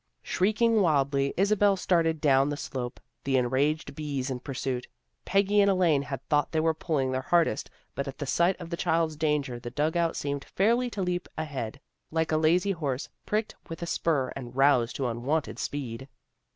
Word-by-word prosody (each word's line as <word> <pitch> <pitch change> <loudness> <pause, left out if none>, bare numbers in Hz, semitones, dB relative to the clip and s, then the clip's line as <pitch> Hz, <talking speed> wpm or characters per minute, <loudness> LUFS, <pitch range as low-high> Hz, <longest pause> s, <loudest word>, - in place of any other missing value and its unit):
Shrieking 220 +3 +2
wildly, 140 -4 +2
Isabel 200 +1 +3
started 165 -4 +1
down 140 -2 +4
the 145 - -3
slope, 125 -5 -5 0.2
the 135 -1 +2
enraged 135 +6 0
bees 140 -3 -3
in 125 - -3
pursuit. 130 -2 -4 0.4
Peggy 200 +1 +3
and 200 - +4
Elaine 175 -7 +3
had 140 -2 -6
thought 145 0 +2
they 160 - +1
were 160 0 +2
pulling 150 -5 -1
their 130 0 -1
hardest 170 +5 +1 0.2
but 140 +1 -3
at 135 -1 -6
the 145 - -4
sight 170 +7 +2
of 170 -1 -8
the 170 - -2
child's 160 -2 +1
danger 150 -5 0
the 120 - -6
dug 150 +5 -1
out 170 -1 +1
seemed 140 -1 -3
fairly 235 +5 +1
to 200 -5 -3
leap 180 0 -2
ahead, 140 -5 -4 0.3
like 160 0 0
a 155 - +3
lazy 175 +5 +3
horse 145 -7 -3 0.2
pricked 215 +1 -1 0.2
with 165 +1 -6
a - - -1
spur 150 -6 0
and 125 -2 -8
roused 135 -3 +3
to 135 - -2
unwonted 130 +7 -2
speed. 135 -2 -4
150 Hz, 185 wpm, -28 LUFS, 135-170 Hz, 0.4 s, down